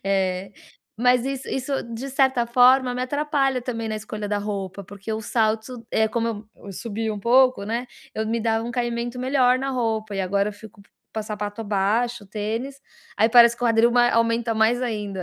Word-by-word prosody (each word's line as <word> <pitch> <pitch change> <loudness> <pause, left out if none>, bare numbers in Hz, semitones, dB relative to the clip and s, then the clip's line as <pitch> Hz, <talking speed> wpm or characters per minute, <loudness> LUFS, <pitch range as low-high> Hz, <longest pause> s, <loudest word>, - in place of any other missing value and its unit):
É, 190 0 -1 0.4
mas 250 +1 +3
isso 270 -1 -4
isso 265 +1 -3 0.2
de 260 +4 -5
certa 265 -3 +2
forma 250 +1 +5
me 250 - -2
atrapalha 280 -1 0
também 230 -3 -4
na 215 - -2
escolha 215 -1 -6
da 205 - 0
roupa, 200 -2 -5
porque 200 +3 -7
o 220 - -2
salto, 225 +2 -1
eh, 220 0 +2
como 225 -2 -3
eu 200 - -10
subia 220 +2 -3
um 205 - -7
pouco, 255 -1 +4
né, 235 +4 -3 0.3
eu 220 0 -2
me 230 +1 -1
dava 225 0 0
um 240 - -4
caimento 240 0 -2
melhor 255 -1 +3
na 270 +1 -2
roupa 220 -4 -2
e - - 0
agora 200 +2 0
eu - - -10
fico 205 0 -14
p 220 +2 -9
sapato 210 +1 -5
baixo, 210 +3 0
tênis. 225 +7 -4 0.4
Aí 220 +2 +4
parece 235 0 +7
que - - -11
o - - +4
quadril 230 +1 +4
mai 240 0 +5
aumenta 230 0 +1
mais 220 +3 +2
ainda. 210 -5 -3
230 Hz, 195 wpm, -23 LUFS, 210-245 Hz, 0.4 s, parece